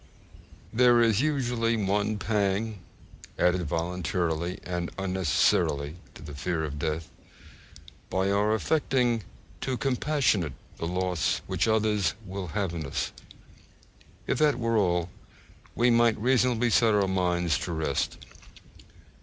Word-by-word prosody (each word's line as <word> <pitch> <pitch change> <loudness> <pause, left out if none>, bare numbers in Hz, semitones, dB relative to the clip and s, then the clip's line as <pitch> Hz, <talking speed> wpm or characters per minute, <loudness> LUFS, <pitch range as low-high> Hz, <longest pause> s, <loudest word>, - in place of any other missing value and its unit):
There 120 0 +5
is 115 -1 +3
usually 120 -6 0
one 105 +1 0
pang 105 0 -1 0.6
added 90 0 +2
voluntarily 85 +1 -2
and 90 -1 -3
unnecessarily 85 -5 +1 0.2
to - - -11
the 75 - -8
fear 80 +3 -2
of 75 -2 -4
death, 80 +2 -3 1.0
by 95 +1 0
our 105 +2 +2
affecting 125 -3 +1 0.4
to 130 -2 -2
compassionate 130 - +1 0.2
the 85 - -3
loss 90 -2 0
which - - 0
others 105 -4 +1
will 95 0 -5
have 95 0 -2
in 80 -2 -4
us. 70 - -3 1.1
If - - -1
that 150 -4 +3
were 115 -1 0
all, 90 -4 +1 0.6
we 120 +1 +3
might 115 -1 +4
reasonably 120 0 +2
set 110 -1 +4
our 100 -2 +2
minds 90 -4 +1
at - - -4
rest. 80 -5 -1
100 Hz, 120 wpm, -27 LUFS, 85-115 Hz, 1.1 s, There